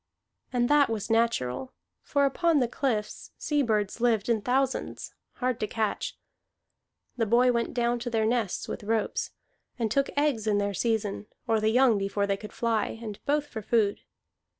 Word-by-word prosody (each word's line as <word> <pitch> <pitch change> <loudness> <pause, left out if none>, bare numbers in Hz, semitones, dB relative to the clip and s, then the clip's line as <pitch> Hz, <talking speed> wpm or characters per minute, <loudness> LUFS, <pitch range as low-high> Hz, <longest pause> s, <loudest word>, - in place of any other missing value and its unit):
And 245 -1 +2
that 290 -2 +4
was 225 0 -3
natural, 230 - 0 0.3
for 285 -1 +1
upon 330 +4 +2
the 250 -4 +3
cliffs 230 -4 -2
sea 295 -1 0
birds 215 -3 0
lived 230 -3 +2
in 225 -2 +2
thousands, 260 +3 -1 0.2
hard 255 -2 -1
to 215 - -1
catch. 220 -1 -2 1.0
The 225 -2 +1
boy 245 +3 +5
went 235 0 -1
down 240 0 +1
to 240 +1 -4
their 225 -2 +1
nests 225 -4 0
with - - -5
ropes, 220 0 -1 0.5
and 225 -3 -1
took 275 +3 +2
eggs 280 -7 +1
in 210 -1 +3
their 200 0 0
season, 210 -1 -1 0.2
or 225 -1 +3
the 215 0 +2
young 240 -2 +4
before 200 +1 0
they 200 0 +1
could 210 +1 -9
fly, 225 -2 -1
and 215 -3 -8
both 295 +1 +2
for 245 -6 -7
food. 210 -1 +1
230 Hz, 175 wpm, -28 LUFS, 215-250 Hz, 1.0 s, boy